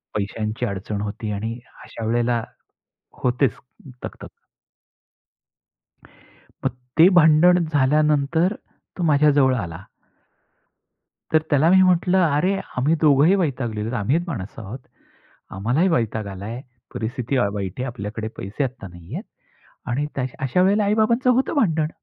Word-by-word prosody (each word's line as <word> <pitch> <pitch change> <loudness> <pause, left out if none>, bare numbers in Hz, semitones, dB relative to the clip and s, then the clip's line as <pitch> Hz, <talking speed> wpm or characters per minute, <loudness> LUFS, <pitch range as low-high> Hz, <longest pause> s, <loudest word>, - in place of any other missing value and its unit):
पैशांची 110 +3 -2
अडचण 100 0 -4
होती 105 +1 -4
आणि 110 +4 -4 0.2
अशा 115 - -7
वेळेला 120 +1 +1 0.8
होतेच 125 0 +2 0.5
तक-तक. - - -8 2.4
मग - - +2 0.3
ते 170 - +9
भांडण 170 +2 +5
झाल्यानंतर, 150 +5 +2 0.4
तो 180 - -4
माझ्याजवळ 145 -4 +4
आला. 85 -8 -6 1.5
तर 155 0 +4
त्याला 150 +3 +4
मी 190 +1 +6
म्हटलं, 185 0 +3 0.2
"अरे 185 +6 +2 0.2
आम्ही 140 +6 +2
दोघंही 150 +4 +5
वैतागलेलोत. 120 - -2
आम्हीच 140 +12 +1
माणसं 115 - -6
आहोत, 105 +6 -7 0.7
आम्हालाही 120 - +1
वैताग 110 - -1
आलाय. 100 +5 -6 0.3
परिस्थिती 125 +3 -3
वाईट 100 -5 -1
आहे, 130 - -2
आपल्याकडे 110 -1 -5
पैसे 100 +9 -3
आता 125 -6 -6
नाहीयेत 85 -1 -8 0.7
आणि 140 +5 -1 0.3
अशा 135 +7 +1
वेळेला 205 +3 +3
आई-बाबांचं 220 +5 +2
होतं 255 +5 +1
भांडण." 160 - +1
130 Hz, 115 wpm, -22 LUFS, 110-165 Hz, 2.4 s, ते